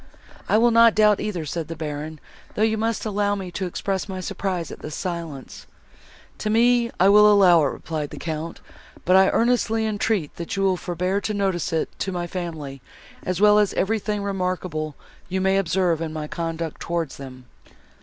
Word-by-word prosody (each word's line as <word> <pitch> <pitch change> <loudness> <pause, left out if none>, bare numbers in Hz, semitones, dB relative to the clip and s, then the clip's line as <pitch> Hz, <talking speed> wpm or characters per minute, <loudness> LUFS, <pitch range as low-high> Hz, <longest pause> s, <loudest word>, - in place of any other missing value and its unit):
"I - - +4
will 235 +2 +4
not 230 -1 +6
doubt 210 -1 +4
either," 180 -7 -3
said 160 +1 -4
the 165 - -6
Baron, 155 0 -5 0.4
"though 215 - +1
you 220 0 +2
must 225 0 -1
allow 205 -1 0
me 190 -3 -6
to 185 +2 -3
express 195 +2 -3
my 190 -1 -4
surprise, 180 -2 -3
at - - -9
this 150 0 -7
silence." 170 -7 -6 0.7
"To 215 - -2
me 235 +2 +3
I 185 - +5
will 210 +1 +7
allow 180 -5 +6
it," - - -1
replied 150 -1 -5
the - - -9
Count, 160 0 -5 0.4
"but 185 - +4
I 190 0 +6
earnestly 230 -2 +1
entreat 210 -6 -1
that 170 +2 -4
you 195 - 0
will 190 -1 +3
forbear 180 +3 -2
to 215 - -2
notice 190 -4 -1
it 160 -1 0
to 195 - -2
my 175 -1 -3
family, 160 -7 -6 0.4
as 185 -1 -3
well 210 0 +6
as 205 -2 +1
everything 210 0 -1
remarkable 180 -6 -3 0.3
you 190 +1 -1
may 190 +1 +2
observe 175 -3 +1
in 160 -1 -3
my 155 -1 -5
conduct 165 -1 -4
towards 170 -4 -3
them." 130 -2 -10
185 Hz, 185 wpm, -23 LUFS, 165-210 Hz, 0.7 s, will